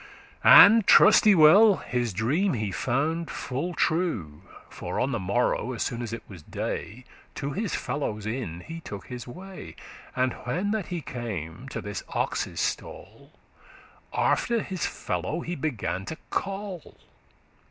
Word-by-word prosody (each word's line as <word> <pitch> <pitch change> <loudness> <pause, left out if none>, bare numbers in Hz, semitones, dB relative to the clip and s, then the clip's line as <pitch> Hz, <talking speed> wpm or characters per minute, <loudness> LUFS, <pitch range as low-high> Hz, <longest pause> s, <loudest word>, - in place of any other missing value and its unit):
"And, 220 0 +9
truste 210 -1 +7
well, 190 +7 +7
his 120 -7 -2
dream 145 - 0
he 105 -3 -2
found 150 - -1
full 145 +7 -4
true; 110 - -1 0.3
For - - -5
on 130 +2 0
the 115 - -1
morrow, 120 +5 0
as 120 - -2
soon 120 0 -3
as 120 -2 -5
it 115 - -6
was 90 -5 -11
day, 115 +9 -5 0.3
To 140 - -4
his 205 +4 -2
fellowes 110 -8 -3
inn 110 -7 -4
he 165 - -8
took 100 -11 -8
his 125 -1 -8
way; 185 +8 -10 0.4
And 130 -1 +1
when 180 +11 -1
that 215 -4 -2
he 175 -2 -4
came 115 - -6
to - - -5
this 105 -1 -5
ox's - - -2
stall, - - -5 0.8
After 235 -2 +1
his 185 -3 -3
fellow 165 +3 -3
he 170 - -4
began 115 - -3
to 160 - -6
call. 195 -3 -4
135 Hz, 145 wpm, -26 LUFS, 110-180 Hz, 0.8 s, And